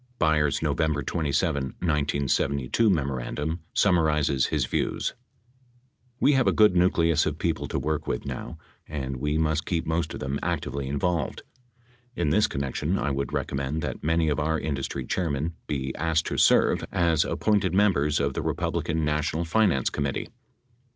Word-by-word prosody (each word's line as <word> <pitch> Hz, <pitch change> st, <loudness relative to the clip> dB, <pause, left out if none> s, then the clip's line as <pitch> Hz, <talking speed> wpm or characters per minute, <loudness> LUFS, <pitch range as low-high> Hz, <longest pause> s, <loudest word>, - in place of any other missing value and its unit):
Byers' 75 Hz, -, +2 dB
November 80 Hz, +1 st, 0 dB
27, 75 Hz, -1 st, 0 dB
1972, 70 Hz, -, +1 dB
memorandum 75 Hz, 0 st, -1 dB
summa 90 Hz, -2 st, +3 dB
rizes 75 Hz, -4 st, +2 dB
his -, -, 0 dB
views: -, -, -1 dB, 1.1 s
We 145 Hz, -, +4 dB
have 135 Hz, -2 st, +3 dB
a -, -, +5 dB
good 105 Hz, -4 st, +5 dB
nucleus 85 Hz, -3 st, +3 dB
of 75 Hz, -1 st, -2 dB
people 80 Hz, -2 st, -1 dB
to -, -, -3 dB
work 75 Hz, 0 st, -2 dB
with -, -, -2 dB
now -, -, -6 dB, 0.3 s
and 65 Hz, -3 st, -4 dB
we 75 Hz, +4 st, -1 dB
must 80 Hz, -1 st, 0 dB
keep 85 Hz, -2 st, -1 dB
most 80 Hz, 0 st, -1 dB
of -, -, -6 dB
them 65 Hz, +1 st, -3 dB
actively 70 Hz, -1 st, -2 dB
involved. 75 Hz, +2 st, -1 dB, 0.7 s
In 75 Hz, -, 0 dB
this 105 Hz, +6 st, +4 dB
connection, 70 Hz, +6 st, -2 dB
I 75 Hz, -, -1 dB
would 70 Hz, 0 st, -2 dB
recommend 70 Hz, +3 st, -2 dB
that -, -, -4 dB
many 80 Hz, +1 st, +2 dB
of 75 Hz, 0 st, 0 dB
our 80 Hz, +1 st, 0 dB
industry 70 Hz, -2 st, -3 dB
chairmen 80 Hz, 0 st, -1 dB
be 65 Hz, -3 st, -2 dB
asked 80 Hz, +1 st, 0 dB
to -, -, -3 dB
serve -, -, +4 dB
as 85 Hz, -4 st, +2 dB
appointed 100 Hz, -4 st, +1 dB
members 75 Hz, -8 st, +3 dB
of 70 Hz, -1 st, 0 dB
the -, -, -2 dB
Republican 80 Hz, -1 st, -1 dB
Na 75 Hz, 0 st, +1 dB
tional 80 Hz, +2 st, -2 dB
Finance 85 Hz, -, +2 dB
Committee. 70 Hz, -2 st, -2 dB
75 Hz, 160 wpm, -26 LUFS, 70-85 Hz, 1.1 s, a